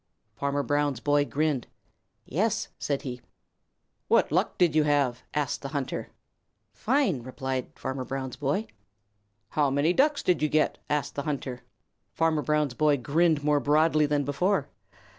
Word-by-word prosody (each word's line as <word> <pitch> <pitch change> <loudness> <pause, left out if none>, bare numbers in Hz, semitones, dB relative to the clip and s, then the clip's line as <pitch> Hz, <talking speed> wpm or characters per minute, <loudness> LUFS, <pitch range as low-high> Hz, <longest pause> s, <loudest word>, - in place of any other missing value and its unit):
Farmer 140 +3 -1
Brown's 145 -3 0
boy 145 +2 +2
grinned. 150 -3 -1 0.6
"Yes," 220 - 0
said 140 -2 -2
he. 125 -2 -6 0.9
"What - - +3
luck - - +1
did 175 -4 +3
you 155 - +5
have?" 140 -4 +1
asked 150 -3 -1
the 140 - -4
hunter. 140 -2 -4 0.6
"Fine," 240 - +1
replied 130 +1 -4
Farmer 130 0 -4
Brown's 130 0 -4
boy. 145 +10 -1 0.8
"How 145 -2 +2
many 145 +5 +2
Ducks 290 +6 +2
did 180 -4 +2
you 155 - +2
get?" 155 0 +1
asked 145 -1 -1
the 140 - -3
hunter. 135 -3 -4 0.5
Farmer 165 -2 +2
Brown's 150 -3 +1
boy 150 +2 +3
grinned 155 +3 +2
more 150 0 +3
broadly 155 +1 +3
than 145 -1 +1
before. 145 +3 0
145 Hz, 145 wpm, -27 LUFS, 135-155 Hz, 0.9 s, you